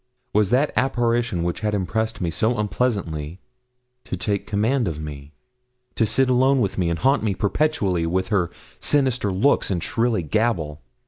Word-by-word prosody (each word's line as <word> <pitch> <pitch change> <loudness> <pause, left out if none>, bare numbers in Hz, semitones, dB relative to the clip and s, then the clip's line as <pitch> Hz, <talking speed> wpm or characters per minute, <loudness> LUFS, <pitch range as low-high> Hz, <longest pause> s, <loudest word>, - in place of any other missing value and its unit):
Was 105 -2 +3
that 135 +6 +2
apparition 120 -6 +1
which 85 +3 -2
had 105 -1 -1
impressed 110 +4 -2
me 85 -2 -1
so 110 +6 +1
unpleasantly 95 -7 -2 0.7
to 95 - -4
take 100 +2 -1
the - - -16
command 110 +4 +1
of 80 -3 -3
me 75 -2 -8 0.6
to 115 - +1
sit 135 +5 +3
alone 130 +2 +3
with 100 -5 0
me, 90 -3 0
and 85 - -1
haunt 135 - +2
me 105 -3 0
perpetually 100 - 0
with 95 +2 -1
her 95 -6 +1 0.3
sinister 130 -7 +1
looks 105 +10 +2
and 90 -4 -1
shrilly 115 -5 0
gabble? 80 -4 -1
105 Hz, 170 wpm, -23 LUFS, 85-120 Hz, 0.7 s, Was